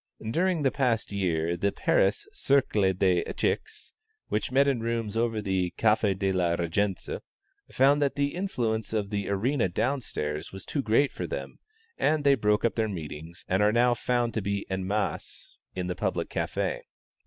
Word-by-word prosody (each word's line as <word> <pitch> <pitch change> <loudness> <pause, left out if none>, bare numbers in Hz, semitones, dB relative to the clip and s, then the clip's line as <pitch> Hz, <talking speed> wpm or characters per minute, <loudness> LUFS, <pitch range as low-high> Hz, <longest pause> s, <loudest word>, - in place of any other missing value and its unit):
During 175 +1 +1
the 135 - +3
past 125 -7 0
year, 85 -4 0
the 100 +3 0
Paris 100 +1 +1
Cercle 110 -8 +2
des 90 -2 +2
Echecs, 435 -1 -3 0.4
which 110 - -1
met 140 +2 +4
in 135 -4 +2
rooms 115 -2 -2
over 115 -2 0
the 95 -3 -1
Café 105 -3 +3
de 95 0 +1
la 90 -2 +1
Régence, 90 +3 -1 0.5
found 140 +3 +4
that 140 -1 +1
the 140 0 0
influence 120 - -2
of 105 -2 -1
the 100 -1 -2
arena 115 +2 +1
down 130 +10 0
stairs 75 -7 -4
was 95 0 -8
too 145 - -1
great 130 +4 +3
for - - -5
them, - - -6 0.4
and 155 -1 +2
they 140 -1 +6
broke 105 -3 +2
up 115 - +2
their 110 -1 0
meetings, 80 -2 -7
and 95 +2 +1
are 105 +1 +4
now 120 +2 +4
to 120 -2 0
be 100 +1 -2
found - - -14
en 95 0 -2
masse 105 0 -3 0.2
in 90 -1 -2
the 90 - -2
public - - -2
café. - - -1
105 Hz, 175 wpm, -27 LUFS, 95-125 Hz, 0.5 s, they